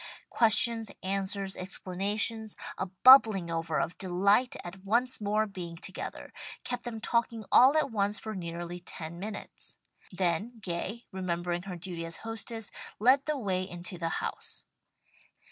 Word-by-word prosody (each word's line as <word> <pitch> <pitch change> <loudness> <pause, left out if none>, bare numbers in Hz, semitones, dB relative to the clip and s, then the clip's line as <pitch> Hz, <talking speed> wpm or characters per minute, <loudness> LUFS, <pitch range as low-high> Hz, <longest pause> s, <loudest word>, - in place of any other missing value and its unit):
Questions, 225 -1 +5
answers, 195 0 -1
explanations, 205 +4 -1 0.2
a 190 - -1
bubbling 195 -3 +7
over 165 -1 -1
of 175 - -2
delight 200 +6 +2
at 185 +2 -9
once 235 +5 +1
more 210 +1 +1
being 180 -5 -7
together, 185 +2 -6 0.3
kept 245 0 -4
them 230 -2 -4
talking 230 -1 0
all 265 +5 +7
at 300 -4 +1
once 205 -1 +1
for 220 +2 -6
nearly 175 -1 -5
ten 170 -1 -7
minutes. 210 +2 -7 0.3
Then 185 +6 -1
Gay, 195 +4 -4
remembering 175 -2 -2
her 180 - -4
duty 175 -1 -6
as 165 0 -4
hostess 225 -1 -3 0.3
led 260 +5 +4
the 305 -1 -1
way 190 -7 -1
into 180 -1 -7
the 165 -1 -1
house. - - -5
195 Hz, 140 wpm, -30 LUFS, 175-225 Hz, 0.3 s, bubbling